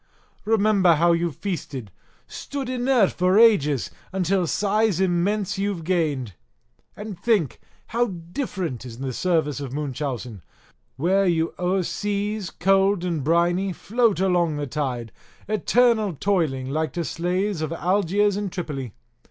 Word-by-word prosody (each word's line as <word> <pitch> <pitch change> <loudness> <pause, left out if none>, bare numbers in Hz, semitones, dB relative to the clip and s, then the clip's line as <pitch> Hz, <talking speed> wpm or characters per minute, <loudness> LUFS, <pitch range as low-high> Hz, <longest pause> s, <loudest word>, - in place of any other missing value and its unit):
Remember 210 -5 +4
how 170 +3 +3
you've 170 -3 0
feasted, 140 - -5 0.3
stood 275 -3 -6
inert 250 -4 +2
for 185 +2 +2
ages, 150 - +4 0.2
until 185 -1 +1
size 210 +1 +1
immense 195 +2 0
you've 200 -4 -2
gained. 155 - -1 0.6
And 210 -3 -7
think, 205 - +1 0.3
how 240 +1 +1
different 175 - -4
is 120 -3 -9
the 130 0 -4
service 160 -2 0
of 135 -3 -6
Munchausen, 130 - -4 0.5
where 190 +7 +2
you 165 -1 +1
o'er 180 +1 +1
seas, 205 +1 -2
cold, 190 -4 +1
briny, 175 +5 +2
float 225 +1 +1
along 175 -4 +2
the 145 - -2
tide, 125 -5 -3 0.4
eternal 215 0 +2
toiling 140 -7 0
like 155 +2 -1
to 170 -1 -2
slaves 180 +2 -1
of 155 0 -2
Algiers 195 +3 +1
and 205 -2 -3
Tripoli. 140 - -5
180 Hz, 125 wpm, -24 LUFS, 155-205 Hz, 0.6 s, Remember